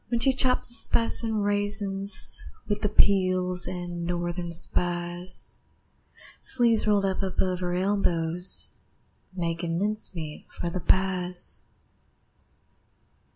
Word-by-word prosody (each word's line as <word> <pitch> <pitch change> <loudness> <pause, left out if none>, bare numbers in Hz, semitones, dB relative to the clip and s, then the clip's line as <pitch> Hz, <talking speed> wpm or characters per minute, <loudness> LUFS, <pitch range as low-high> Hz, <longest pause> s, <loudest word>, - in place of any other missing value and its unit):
When 235 - -1
she 265 +3 +3
chops 255 -1 +2
the 240 - -6
spice 230 0 +5
an' 220 -2 -2
raisins, 205 -1 +2 0.2
With 205 0 -2
the 210 - 0
peels 185 -3 +1
an' 175 -1 -6
Northern 175 0 -4
Spies, 175 +1 0 0.8
Sleeves 235 -4 +2
rolled 205 -2 +2
up 190 0 -2
above 185 -1 -2
her 180 -1 -3
elbows, 180 -2 -1 0.6
Makin' 170 -2 -3
mincemeat 185 -6 -3
for 170 - -5
the 185 - -4
pies. 180 0 -1
185 Hz, 110 wpm, -25 LUFS, 175-205 Hz, 0.8 s, spice